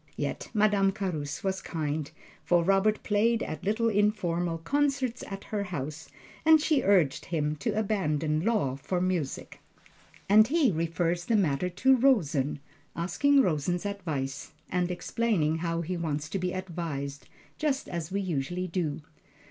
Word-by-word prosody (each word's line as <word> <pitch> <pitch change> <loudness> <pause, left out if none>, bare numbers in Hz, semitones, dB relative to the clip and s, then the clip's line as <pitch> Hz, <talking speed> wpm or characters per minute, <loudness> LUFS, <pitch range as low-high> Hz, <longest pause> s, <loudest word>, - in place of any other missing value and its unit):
Yet - - -3
Madame 205 -3 +3
Carus 160 -8 -4
was 190 0 -1
kind, 155 -2 -3 0.3
for 175 -1 +3
Robert 195 +4 +2
played 225 +2 +2
at 155 - -6
little 220 +3 +1
informal 185 -6 +1
concerts 270 - 0
at 195 0 -7
her 205 -2 -3
house, 155 -3 -5 0.3
and 315 0 +7
she 300 -2 +2
urged 185 -8 +3
him 150 -3 -1
to 145 - -2
abandon 155 -8 0
law 205 - +1
for 180 +6 -2
music; 175 -6 -2 0.7
and 215 +2 +7
he 290 -4 +3
refers 170 +1 -1
the 230 - +2
matter 180 -3 +1
to 265 +9 +4
Rosen, 160 - +2 0.4
asking 270 +12 +3
Rosen's 175 - 0
advice 155 -10 -4 0.2
and 180 0 +1
explaining 175 -4 0
how 165 0 -1
he 175 +2 -3
wants 160 -2 -3
to 195 - -2
be 180 0 -1
advised, 160 -7 -5 0.3
just 290 -3 0
as 170 -1 -5
we 200 +1 0
usually 175 0 -2
do. 165 -4 -2
180 Hz, 145 wpm, -28 LUFS, 160-210 Hz, 0.7 s, and